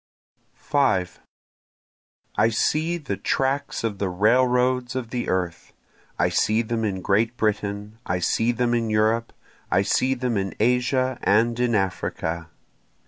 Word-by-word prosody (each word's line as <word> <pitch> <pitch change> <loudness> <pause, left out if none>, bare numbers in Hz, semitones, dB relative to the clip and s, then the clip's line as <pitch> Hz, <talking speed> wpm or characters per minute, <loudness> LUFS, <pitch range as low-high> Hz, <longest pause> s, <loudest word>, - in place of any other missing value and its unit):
5 - - 0 1.2
I - - +3
see 160 +3 0
the 150 - -4
tracks 135 -1 -1
of 105 -4 -2
the 100 - 0
railroads 125 +5 +2
of 125 -3 -4
the 125 -1 -2
earth, 90 -3 -2 0.4
I - - +3
see 110 +2 +2
them 115 0 -2
in 95 -4 -2
Great 115 +4 +1
Britain, 105 0 -2
I 90 - -1
see 115 +7 +1
them 120 0 0
in 115 -2 0
Europe, 110 +2 +1 0.4
I 95 - +3
see 130 +6 +1
them 125 -3 -1
in 95 -1 -2
Asia 125 +2 +1
and 115 +3 +2
in 120 -2 +2
Africa. 85 -4 -2
115 Hz, 140 wpm, -24 LUFS, 100-125 Hz, 1.2 s, I